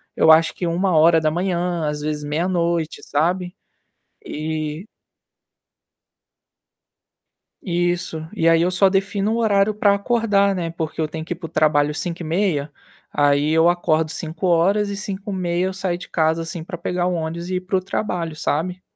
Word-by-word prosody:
eu 160 Hz, -, +5 dB
acho 165 Hz, +1 st, +5 dB
que 180 Hz, -, -4 dB
01h, 170 Hz, 0 st, +2 dB
às 150 Hz, 0 st, -3 dB
vezes 150 Hz, 0 st, -3 dB
meia 155 Hz, +5 st, -1 dB
noite, 170 Hz, -3 st, -1 dB
sabe? 180 Hz, +4 st, -1 dB, 0.7 s
E 155 Hz, +3 st, -4 dB, 2.8 s
Isso. 175 Hz, -3 st, -2 dB
E 165 Hz, -, +1 dB
aí, 165 Hz, 0 st, +5 dB
eu 180 Hz, +1 st, +2 dB
só 190 Hz, +1 st, +4 dB
defino 200 Hz, +2 st, 0 dB
o -, -, 0 dB
horário 210 Hz, -2 st, +2 dB
pra 205 Hz, -1 st, +3 dB
acordar, 200 Hz, -2 st, +2 dB
né, 170 Hz, -2 st, -2 dB
porque 160 Hz, -1 st, -5 dB
eu 155 Hz, -, 0 dB
tenho 160 Hz, +1 st, -6 dB
que 175 Hz, -, -3 dB
ir -, -, -10 dB
pro 165 Hz, -1 st, -8 dB
trabalho 150 Hz, -1 st, +2 dB
5h30. 165 Hz, -3 st, -1 dB, 0.4 s
Aí, 145 Hz, +1 st, +2 dB
eu 160 Hz, +2 st, +5 dB
acordo 160 Hz, -3 st, +1 dB
5h. 175 Hz, +5 st, +1 dB
E 200 Hz, -, -3 dB
5h30, 190 Hz, -3 st, -2 dB
eu 190 Hz, -, -4 dB
saio 185 Hz, -2 st, -2 dB
de -, -, -11 dB
casa, 160 Hz, 0 st, +1 dB
assim, 165 Hz, 0 st, -6 dB
pra 175 Hz, +1 st, -7 dB
pegar 180 Hz, +1 st, -2 dB
o 180 Hz, -, 0 dB
ônibus 170 Hz, +2 st, -4 dB
e 185 Hz, -, -1 dB
ir 180 Hz, -, -1 dB
pro 185 Hz, +1 st, 0 dB
trabalho, 180 Hz, -4 st, -3 dB
sabe? 180 Hz, +4 st, -2 dB
170 Hz, 155 wpm, -21 LUFS, 160-185 Hz, 2.8 s, eu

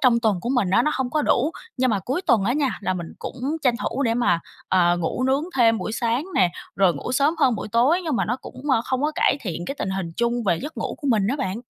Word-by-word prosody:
trong 235 Hz, -3 st, +4 dB
tuần 210 Hz, -6 st, +1 dB
của 240 Hz, -, -4 dB
mình 200 Hz, -7 st, +1 dB
á, 235 Hz, -, +4 dB
nó 305 Hz, -, +1 dB
hông 260 Hz, -2 st, -2 dB
có 305 Hz, +2 st, +1 dB
đủ. 280 Hz, +2 st, +2 dB, 0.3 s
Nhưng 255 Hz, -1 st, +2 dB
mà 205 Hz, -, +1 dB
cuối 265 Hz, -, -2 dB
tuần 235 Hz, -, +3 dB
á 235 Hz, -, +2 dB
nha, 280 Hz, -1 st, +1 dB
là 185 Hz, -2 st, -1 dB
mình 170 Hz, -2 st, -6 dB
cũng -, -, -7 dB, 0.2 s
tranh 250 Hz, -3 st, +3 dB
thủ 275 Hz, -, -1 dB
để 230 Hz, -3 st, +1 dB
mà, 175 Hz, -8 st, +2 dB, 0.3 s
ờ, 175 Hz, -2 st, +3 dB
ngủ 175 Hz, +8 st, -2 dB
nướng 270 Hz, +3 st, +2 dB
thêm 225 Hz, -2 st, +4 dB
buổi 215 Hz, -, -4 dB
sáng 235 Hz, +4 st, 0 dB
nè, 180 Hz, -2 st, +4 dB, 0.3 s
rồi 185 Hz, -3 st, +4 dB
ngủ 195 Hz, -, -5 dB
sớm 285 Hz, +5 st, +3 dB
hơn 255 Hz, -4 st, +4 dB
buổi 215 Hz, -, -5 dB
tối. 260 Hz, +10 st, +3 dB
Nhưng 305 Hz, -6 st, 0 dB
mà -, -, +1 dB
nó 245 Hz, -, -1 dB
cũng, 265 Hz, +2 st, -7 dB
ơ, 245 Hz, -, +4 dB
không 260 Hz, 0 st, -1 dB
có 300 Hz, +1 st, +1 dB
cải 330 Hz, -, +3 dB
thiện 175 Hz, -4 st, -4 dB
cái 275 Hz, -, -3 dB
tình 190 Hz, -, -2 dB
hình 185 Hz, -3 st, -3 dB
chung 235 Hz, 0 st, 0 dB
về 175 Hz, -4 st, +2 dB
giấc 305 Hz, +2 st, -7 dB
ngủ -, -, -3 dB
của 285 Hz, -, -3 dB
mình 210 Hz, -4 st, +2 dB
á 260 Hz, -, 0 dB
bạn. 225 Hz, -6 st, -3 dB
235 Hz, 280 wpm, -23 LUFS, 195-265 Hz, 0.3 s, trong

